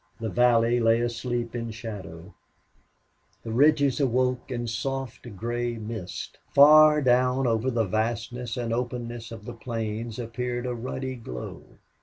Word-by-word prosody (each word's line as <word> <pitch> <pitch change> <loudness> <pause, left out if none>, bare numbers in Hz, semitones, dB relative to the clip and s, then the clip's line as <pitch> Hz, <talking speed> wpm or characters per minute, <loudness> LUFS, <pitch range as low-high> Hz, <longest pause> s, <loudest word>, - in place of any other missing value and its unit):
The 115 -1 -3
valley 120 +3 +3
lay 115 0 +4
asleep 120 0 -2
in 115 -1 -3
shadow, 100 -6 -8 1.1
the 115 - -5
ridges 140 +1 +4
awoke 125 -1 +1
in 120 -2 -3
soft 125 -1 -4
gray 120 +3 -2
mist. 110 -4 -6 0.2
Far 150 +1 +8
down 125 +1 +3
over 115 +1 +1
the 115 -3 +1
vastness 115 +3 -2
and 115 -2 -2
openness 120 -1 -4
of 110 -2 -9
the 120 - -6
plains 115 -1 -4
appeared 120 +1 -3
a 125 - -2
ruddy 130 +2 -4
glow. 60 - -9
120 Hz, 135 wpm, -26 LUFS, 115-125 Hz, 1.1 s, Far